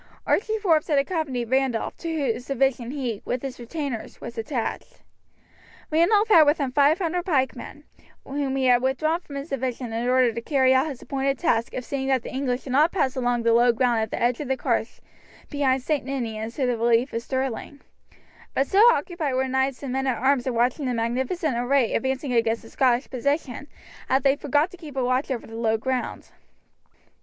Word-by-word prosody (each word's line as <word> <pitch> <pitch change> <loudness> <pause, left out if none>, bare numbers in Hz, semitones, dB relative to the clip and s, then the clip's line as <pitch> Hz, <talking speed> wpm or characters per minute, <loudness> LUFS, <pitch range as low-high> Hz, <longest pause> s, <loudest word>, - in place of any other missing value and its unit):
Archie 440 +1 +1
Forbes 335 -8 +2
had 295 - +2
accompanied 275 -6 -1
Randolph, 260 -3 0
to 335 - -5
whose 270 -6 -2
division 265 -3 0
he, 250 -6 -3
with 250 +1 -3
his 270 -2 -6
retainers, 255 -1 -5
was 235 - -8
attached. 235 +1 -4 0.9
Randolph 405 +7 +4
had 325 -7 +7
with 295 +3 +4
him 275 -3 -2
500 320 +5 +2
pikemen, 280 -3 -2 0.4
whom 275 -1 -2
he 265 -1 0
had 245 -1 +5
withdrawn 295 +6 0
from 290 -5 -11
his 280 +3 -6
division 250 -3 -3
in 235 +2 -1
order 255 -2 +3
to 235 - -4
carry 260 0 +3
out 260 +3 +3
his 275 -5 -7
appointed 275 0 -1
task 235 -9 0
of 255 - -4
seeing 270 -1 -3
that 260 -3 +1
the - - -8
English 260 -1 -2
did 265 - -7
not 300 +6 +4
pass 270 -9 0
along 245 -2 0
the 230 0 +3
low 240 +1 +5
ground 235 0 +1
at 220 - -2
the - - -4
edge 240 0 +1
of 295 - -4
the 265 0 0
carse - - -2 0.5
behind 270 -3 +1
St. 300 0 0
Ninians 230 -4 -4
to 270 - 0
the 245 -2 0
relief 235 +3 +2
of 230 - -2
Stirling; 265 +2 -4 0.8
but 270 - +2
so 395 +8 +4
absorbed 320 -8 -3
were 265 +1 +1
knights 265 +1 -1
and 260 -2 -4
men 265 0 -1
at 250 -3 0
arms 265 +1 +1
in 250 - -1
watching 250 +4 +1
the 250 - -1
magnificent 255 +6 -1
array 245 0 +1
advancing 265 +1 -1
against 230 -1 +1
the 225 - -14
Scottish 255 0 +2
position 280 +1 -2 0.4
that 265 0 +2
they 275 0 +4
forgot 290 +4 +1
to 365 - -12
keep 310 -5 -11
a 265 - 0
watch 255 +3 0
over 255 -3 -3
the 225 - -12
low 225 -1 0
ground. 255 +2 -3
265 Hz, 200 wpm, -24 LUFS, 245-285 Hz, 0.9 s, had